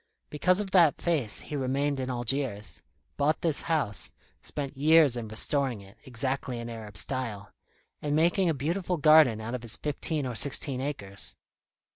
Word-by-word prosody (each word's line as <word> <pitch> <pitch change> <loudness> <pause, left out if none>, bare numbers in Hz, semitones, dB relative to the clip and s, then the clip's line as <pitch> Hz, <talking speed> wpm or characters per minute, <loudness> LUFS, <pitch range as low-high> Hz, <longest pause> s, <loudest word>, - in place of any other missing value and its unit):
Because 180 +5 +2
of 200 -2 -3
that 170 -6 +5
face 145 -11 +1
he 150 - -7
remained 140 +1 -1
in 130 0 -3
Algiers, 120 -3 -1 0.4
bought 145 +1 +1
this 160 -4 0
house, 150 - -1 0.3
spent 140 -2 -5
years 150 -1 +5
in 120 -2 -4
restoring 125 +2 -1
it, 100 +2 -16
exactly 130 0 -3
in 120 0 -6
Arab 110 -2 -9
style, 110 -5 -3 0.5
and 145 0 -1
making 170 +3 +3
a 160 - 0
beautiful 170 +6 -2
garden 155 -7 +6
out 110 +2 -5
of 125 - -3
his 115 -1 -2
fifteen 150 0 -2
or 125 - -3
sixteen 135 +2 +2
acres. 100 -9 -5
135 Hz, 160 wpm, -28 LUFS, 120-155 Hz, 0.5 s, garden